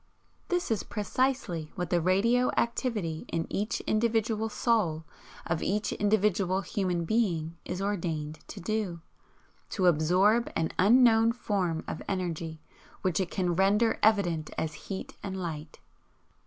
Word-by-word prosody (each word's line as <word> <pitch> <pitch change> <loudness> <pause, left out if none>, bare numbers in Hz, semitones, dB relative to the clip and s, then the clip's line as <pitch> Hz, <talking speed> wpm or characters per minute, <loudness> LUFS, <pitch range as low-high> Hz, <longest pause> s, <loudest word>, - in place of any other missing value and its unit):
This 355 -7 -1
is 220 - +1
precisely 210 - -1
what 180 -1 -3
the 175 -1 +3
radio 230 +8 +3
activity 215 -9 -1
in 165 0 -2
each 210 +3 -1
individual 225 0 +1
soul 195 -10 +1 0.4
of 170 -1 -1
each 210 +2 0
individual 200 -2 +2
human 180 -2 -1
being 170 -6 0
is 180 +2 -3
ordained 165 -6 -2
to - - -8
do, 190 -4 -2 0.7
to 190 - 0
absorb 180 +8 +3
an 160 -1 0
'unknown 225 +2 +6
form 190 -9 -1
of - - -5
energy 170 -4 -3 0.4
which 185 -2 +1
it 185 -3 -1
can 180 -3 0
render 205 +5 +3
evident 175 -8 +2
as 155 -1 -2 0.2
heat 190 -1 -5
and 190 -1 -4
light.' 155 -3 -5
190 Hz, 130 wpm, -29 LUFS, 170-220 Hz, 0.7 s, unknown